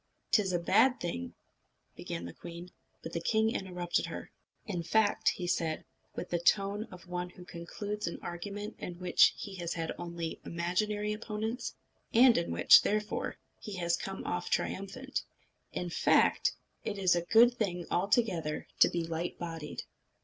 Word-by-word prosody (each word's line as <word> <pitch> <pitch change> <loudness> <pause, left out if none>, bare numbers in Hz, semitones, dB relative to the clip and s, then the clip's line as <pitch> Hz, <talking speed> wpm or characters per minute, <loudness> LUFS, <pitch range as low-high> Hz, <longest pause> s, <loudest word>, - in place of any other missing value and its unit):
"'T 215 - +6
is 190 -2 -1
a 175 - +2
bad 250 +9 +4
thing 85 - -4 0.3
" - - -45
began 85 +1 -5
the 85 - -7
queen; 170 +1 -9 0.3
but 165 - -6
the 170 - -2
king 220 +4 +2
interrupted 180 -2 -1
her. - - -7 0.3
"In 190 -7 -2
fact," 205 +5 +3
said 165 -2 0
he, - - -21 0.3
with 180 - -5
the 175 - +1
tone 200 +4 +2
of 185 -4 -13
one 180 0 -3
who 180 0 -13
concludes 205 +4 -5
an 170 - -3
argument 200 +5 -5
in 175 - -5
which 180 -1 +5
he 200 - -6
has 170 -1 -3
had 165 -1 -2
only 170 -1 -5
imaginary 205 +5 -1
opponents, 220 +2 -4 0.4
and 240 0 +8
in 170 - 0
which, 85 +1 +8
therefore, 210 0 -1 0.2
he 210 - -7
has 170 -2 +1
come 195 0 -6
off 175 0 -2
triumphant 255 +8 -2 0.5
"in 175 -1 -3
fact, - - +3 0.3
it 205 - -3
is 185 -3 +4
a 175 - +1
good 230 +7 +6
thing 180 -7 -2
altogether 180 -5 +1
to - - +8
be 170 -1 -1
light 165 +1 -3
bodied." 165 -3 -5
180 Hz, 165 wpm, -32 LUFS, 170-210 Hz, 0.5 s, and